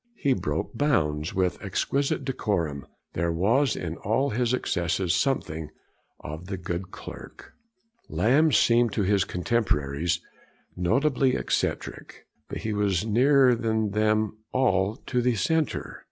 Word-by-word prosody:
He 140 Hz, -, +1 dB
broke 75 Hz, -9 st, -3 dB
bounds 75 Hz, -, 0 dB
with 90 Hz, -2 st, 0 dB
exquisite 140 Hz, -1 st, -1 dB
decorum. 90 Hz, -, -2 dB, 0.3 s
There 85 Hz, 0 st, 0 dB
was 110 Hz, +10 st, +2 dB
in 85 Hz, 0 st, -5 dB
all 125 Hz, +7 st, 0 dB
his 120 Hz, +1 st, 0 dB
excesses 90 Hz, -6 st, 0 dB
something 85 Hz, -, -1 dB, 0.5 s
of 80 Hz, +4 st, -7 dB
'the 95 Hz, -1 st, -4 dB
good 90 Hz, +1 st, -4 dB
clerk.' -, -, -11 dB, 0.6 s
Lamb 150 Hz, +8 st, +3 dB
seemed 120 Hz, -4 st, +4 dB
to 105 Hz, -, 0 dB
his 100 Hz, 0 st, +2 dB
contemporaries 85 Hz, -, 0 dB, 0.6 s
notably 130 Hz, -, +2 dB
eccentric, -, -, -3 dB, 0.2 s
but -, -, -4 dB
he 110 Hz, -, -2 dB
was 100 Hz, -2 st, 0 dB
nearer 130 Hz, +3 st, +4 dB
than 110 Hz, -2 st, 0 dB
them 110 Hz, 0 st, +1 dB
all 105 Hz, -5 st, +2 dB
to 125 Hz, -1 st, 0 dB
the 125 Hz, -1 st, +1 dB
centre. 155 Hz, -, -1 dB
105 Hz, 125 wpm, -26 LUFS, 85-125 Hz, 0.6 s, seemed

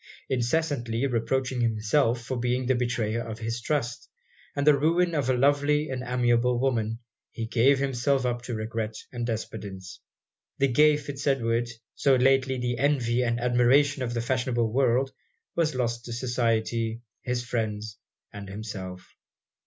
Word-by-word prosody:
Incessantly 125 Hz, -2 st, 0 dB
reproaching 125 Hz, +1 st, 0 dB
himself 115 Hz, +2 st, +1 dB
for 130 Hz, -, -3 dB
being 125 Hz, +1 st, 0 dB
the 130 Hz, -, +3 dB
betrayer 120 Hz, -2 st, -1 dB
of 110 Hz, -2 st, -6 dB
his 115 Hz, +1 st, -4 dB
trust, 120 Hz, -3 st, -2 dB, 0.5 s
and 140 Hz, 0 st, 0 dB
the 150 Hz, -1 st, +7 dB
ruin 170 Hz, +4 st, +2 dB
of 145 Hz, -5 st, 0 dB
a 130 Hz, -, +2 dB
lovely 145 Hz, +3 st, +2 dB
and 130 Hz, -1 st, -3 dB
amiable 120 Hz, 0 st, +2 dB
woman, 115 Hz, -4 st, 0 dB, 0.3 s
he 115 Hz, -, -4 dB
gave 125 Hz, +4 st, +3 dB
himself 135 Hz, 0 st, 0 dB
up 120 Hz, -1 st, -1 dB
to 120 Hz, -1 st, -5 dB
regret 110 Hz, 0 st, -3 dB, 0.2 s
and 120 Hz, -1 st, -3 dB
despondence. 100 Hz, -4 st, -6 dB, 0.6 s
The 135 Hz, 0 st, +2 dB
gay 150 Hz, +4 st, +5 dB
Fitz 145 Hz, -1 st, -6 dB
Edward, 120 Hz, -3 st, +1 dB, 0.2 s
so 140 Hz, -2 st, +3 dB
lately 130 Hz, 0 st, +3 dB
the 120 Hz, -1 st, -2 dB
envy 125 Hz, -4 st, +2 dB
and 120 Hz, -1 st, 0 dB
admiration 125 Hz, +4 st, +3 dB
of 120 Hz, -1 st, -2 dB
the 115 Hz, -, 0 dB
fashionable 120 Hz, -2 st, 0 dB
world, 130 Hz, 0 st, +2 dB, 0.4 s
was 155 Hz, -4 st, +1 dB
lost 120 Hz, -1 st, -1 dB
to 120 Hz, -, -5 dB
society, 115 Hz, -2 st, -1 dB, 0.2 s
his 125 Hz, -1 st, -2 dB
friends, 110 Hz, -3 st, -3 dB, 0.3 s
and 100 Hz, -1 st, -8 dB
himself. 95 Hz, -3 st, -7 dB
120 Hz, 150 wpm, -27 LUFS, 115-135 Hz, 0.6 s, the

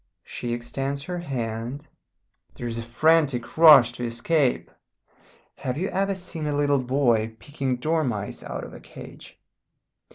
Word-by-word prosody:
She 120 Hz, -, -5 dB
extends 135 Hz, +4 st, -3 dB
her 180 Hz, +3 st, -4 dB
hand. 125 Hz, -2 st, -4 dB, 0.7 s
There 120 Hz, -, -7 dB
is 115 Hz, -1 st, -3 dB
a -, -, -3 dB
frantic 135 Hz, +1 st, +1 dB
rush 150 Hz, -7 st, +8 dB
to 120 Hz, 0 st, -7 dB
escape. 125 Hz, +4 st, 0 dB, 0.9 s
Have 130 Hz, 0 st, -3 dB
you 185 Hz, +4 st, -1 dB
ever 195 Hz, +1 st, 0 dB
seen 170 Hz, -4 st, -5 dB
a 145 Hz, -, -1 dB
little 145 Hz, -2 st, +2 dB
boy 120 Hz, -4 st, +1 dB
picking 135 Hz, -1 st, -3 dB
dormice 125 Hz, -8 st, -2 dB
out -, -, -6 dB
of -, -, -9 dB
a -, -, -10 dB
cage? -, -, -13 dB
135 Hz, 140 wpm, -25 LUFS, 120-155 Hz, 0.9 s, rush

